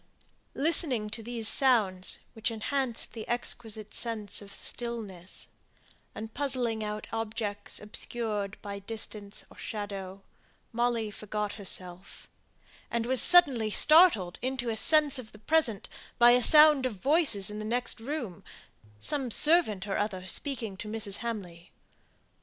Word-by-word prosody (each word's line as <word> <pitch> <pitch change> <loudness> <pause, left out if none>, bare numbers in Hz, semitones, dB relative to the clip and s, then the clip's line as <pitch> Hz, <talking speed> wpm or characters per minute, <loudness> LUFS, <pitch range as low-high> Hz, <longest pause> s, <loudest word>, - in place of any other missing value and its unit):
Listening 270 -8 +2
to 225 - -4
these 230 -1 -4
sounds, 210 -10 +2
which 220 0 -2
enhanced 235 +2 -3
the 220 -2 -8
exquisite 225 -3 -4
sense 215 -4 -1
of 200 -1 -12
stillness, 205 -7 -6 0.7
and 220 0 -8
puzzling 245 -5 -1
out 210 0 -5
objects 215 -2 -4
obscured 210 -1 -4
by 200 -1 -6
distance 205 -1 -8
or - - -16
shadow, 200 -2 -6 0.5
Molly 235 -2 -1
forgot 210 0 -4
herself, 185 -2 -5 0.6
and 235 -1 -2
was 260 +1 +2
suddenly 275 -11 +5
startled 300 - +5
into 255 -1 -3
a - - -3
sense 295 +3 +3
of 220 -3 -11
the - - -13
present 235 -3 0 0.3
by 240 0 +7
a 250 +1 +4
sound 300 -1 +7
of 235 - -7
voices 260 - +1
in 210 - -6
the - - -5
next 240 +2 -1
room 235 - -6 0.6
some 270 - -2
servant 235 - +4
or 200 - -2
other 190 -3 -3
speaking 225 0 -2
to 210 - -7
Mrs. 210 -2 0
Hamley. 185 -8 -7
225 Hz, 135 wpm, -29 LUFS, 205-250 Hz, 0.7 s, by